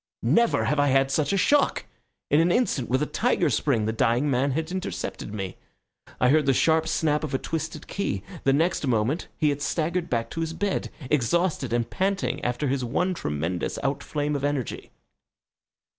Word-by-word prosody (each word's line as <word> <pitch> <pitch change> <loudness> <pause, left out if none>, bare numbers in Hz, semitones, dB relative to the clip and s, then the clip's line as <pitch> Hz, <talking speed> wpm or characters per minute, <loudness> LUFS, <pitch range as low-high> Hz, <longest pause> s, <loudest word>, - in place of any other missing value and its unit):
Never 235 0 +3
have 150 - +1
I 145 - +4
had 135 0 +3
such 145 0 +1
a 200 - +2
shock! 285 +9 +2 0.5
In 145 - +5
an 170 +2 +3
instant, 175 - +1
with 130 +4 +2
a - - +1
tiger 215 0 +1
spring, 120 -8 +1
the 110 - -1
dying 125 +4 +2
man 130 +2 +2
had 160 +3 -2
intercepted 185 - -4
me. 95 -3 -5 0.6
I 125 - +4
heard 150 0 +3
the 135 - +4
sharp 160 +2 +3
snap 155 -1 +1
of 150 - -2
a - - +3
twisted 160 +3 -4
key. 200 - -3 0.2
The 135 - +4
next 160 +1 +1
moment 120 +7 0
he 150 - +2
had 145 0 -2
staggered 170 +3 -1
back 115 -1 -1
to 165 - -3
his 165 0 -2
bed, 200 +3 -1 0.2
exhausted 150 0 +1
and 120 -1 0
panting 195 +1 -1
after 125 +4 -1
his 135 -1 0
one 180 +10 0
tremendous 85 - -3
outflame 145 +2 -1
of 140 - -3
energy. 145 -5 -2
145 Hz, 185 wpm, -25 LUFS, 125-165 Hz, 0.6 s, In